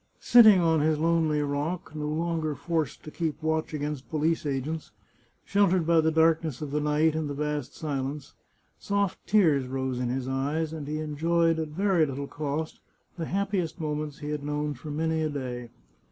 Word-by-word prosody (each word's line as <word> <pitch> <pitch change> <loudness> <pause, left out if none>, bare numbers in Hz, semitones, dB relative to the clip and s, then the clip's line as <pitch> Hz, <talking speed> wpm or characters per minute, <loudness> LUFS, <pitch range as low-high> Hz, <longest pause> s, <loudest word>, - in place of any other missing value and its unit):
Sitting 220 -5 +7
on 165 -2 +3
his 155 +1 +2
lonely 160 -2 +2
rock, 145 +5 -3
no 150 -1 -3
longer 160 -1 -1
forced 155 0 -2
to 150 - -9
keep 160 -2 -2
watch 160 0 0
against 150 -2 -4
police 160 0 0
agents, 145 +3 -3 0.6
sheltered 190 -4 +3
by 165 0 +4
the 160 - +2
darkness 160 -3 +2
of 150 -2 -5
the 150 - 0
night 150 +1 +2
and 155 -2 -2
the 145 - -4
vast 150 -2 -3
silence, 140 -1 -4 0.5
soft 200 -2 -1
tears 155 -11 +3
rose 130 -1 -2
in 125 -1 -1
his 130 +1 -2
eyes, 145 +4 -1
and 150 -3 -6
he 155 +1 -2
enjoyed, 165 +2 +1
at 160 - -2
very 180 +2 +2
little 140 +1 -4
cost, 150 +2 -4 0.4
the 165 - -4
happiest 190 -2 -1
moments 150 -2 -3
he 150 - -6
had 150 -1 -3
known 150 0 -2
for 145 +4 -9
many 160 +2 0
a 155 - 0
day. 125 -4 -5
155 Hz, 180 wpm, -27 LUFS, 145-165 Hz, 0.6 s, Sitting